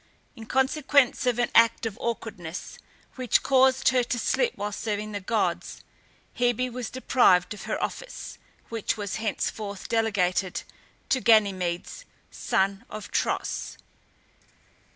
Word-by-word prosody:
In 225 -3 -10
consequence 265 0 +2
of 245 -2 +2
an 240 0 0
act 230 0 +5
of 220 -3 -3
awkwardness, 205 -7 -5 0.4
which 255 -3 +2
caused 265 -1 +4
her 255 -1 +3
to 245 +1 -2
slip 470 - +1
while 205 0 -3
serving 210 0 -3
the 205 - -3
gods, 220 +4 -2 0.5
Hebe 245 +1 +1
was 250 -2 -4
deprived 200 -8 +3
of 210 - -9
her - - -2
office, - - -6 0.3
which 225 -1 -2
was 205 -2 -3
henceforth 210 -2 -3
delegated 195 -5 0 0.5
to 260 -1 +2
Ganymedes, 200 - +2 0.3
son 195 +1 0
of 215 -1 -8
Tros. - - -2
225 Hz, 125 wpm, -26 LUFS, 200-250 Hz, 0.5 s, act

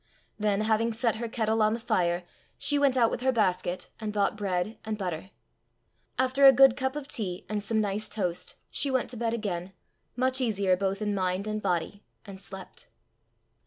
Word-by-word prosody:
Then, 210 -1 +1
having 225 +1 +1
set 225 0 0
her 235 0 -4
kettle 220 -1 0
on 215 0 +4
the - - -5
fire, 175 -6 0 0.3
she 290 -1 +1
went 275 -2 +3
out 230 -2 +4
with - - -3
her 260 +1 +3
basket, 185 -5 0
and 215 -2 -3
bought 205 0 +1
bread, 200 +1 -2
and 220 -1 -3
butter. 185 -2 -4 0.9
After 260 +2 +5
a - - +11
good 265 -1 +6
cup 265 +1 -2
of 295 -2 -5
tea 195 -10 -3
and 210 -1 -2
some 220 +2 0
nice 210 0 -1
toast, 180 -5 -3 0.2
she 280 - -1
went 260 -2 0
to - - -6
bed 230 0 0
again, 190 -4 -4 0.4
much 260 +1 +2
easier 200 -6 +2
both 195 +2 -2
in 210 -1 0
mind 185 0 -1
and 215 0 -3
body, 185 +1 -1 0.2
and 195 -2 -9
slept. 190 -1 -10
215 Hz, 190 wpm, -28 LUFS, 195-235 Hz, 0.9 s, a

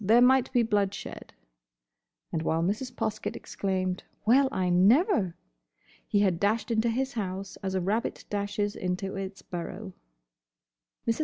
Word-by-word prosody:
There 220 +5 +6
might 260 +1 +5
be 245 -2 +3
bloodshed." 205 -3 -2 1.0
And 160 - -1
while 160 +1 +1
Mrs. 215 +8 -1
Poskett 215 -3 -3
exclaimed 185 -2 -2 0.2
"Well, 265 +4 +5
I 185 -1 0
never!" 200 - +4 0.7
he 205 - +2
had 185 -4 +2
dashed 215 +4 +1
into 225 +1 +2
his 260 +4 -1
house 195 -3 -4
as 190 -1 -2
a 185 - +1
rabbit 210 +6 -1
dashes 205 0 -1
into 185 +2 -2
its 195 0 -6
burrow. 185 +3 -6 1.1
Mrs. 230 - +1
205 Hz, 140 wpm, -28 LUFS, 185-230 Hz, 1.1 s, There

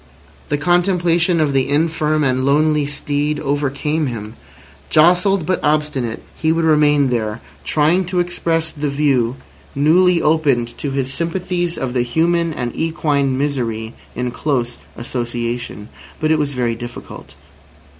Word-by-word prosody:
The 145 - +1
contemplation 175 +1 +2
of 150 -3 +1
the 135 0 +1
infirm 155 0 +1
and 130 -1 +1
lonely 150 +1 +2
steed 145 +1 -1
overcame 145 +2 -1
him. 110 -3 -6 0.6
Jostled, 180 +3 +4
but 185 +3 0
obstinate, 150 -6 -1
he 160 - +1
would 165 0 +1
remain 150 -3 +4
there, 110 -2 -2 0.2
trying 160 +5 +2
to 180 +1 -1
express 165 -2 -1
the 150 -1 -3
view 135 -4 +1 0.4
newly 170 +5 +4
opened 145 -7 +1
to 145 - -2
his 135 -1 -2
sympathies 175 +1 -2
of 130 -2 -3
the 125 - +1
human 165 +7 +1
and 125 -6 -4
equine 145 -5 0
misery 120 -6 -2 0.2
in 125 0 -2
close 125 -4 -2 0.2
association. 120 -2 -4 0.3
But 155 0 +1
it 160 - +3
was 145 -1 -1
very 120 -2 0
difficult. 115 - -9
145 Hz, 135 wpm, -18 LUFS, 125-165 Hz, 0.6 s, Jostled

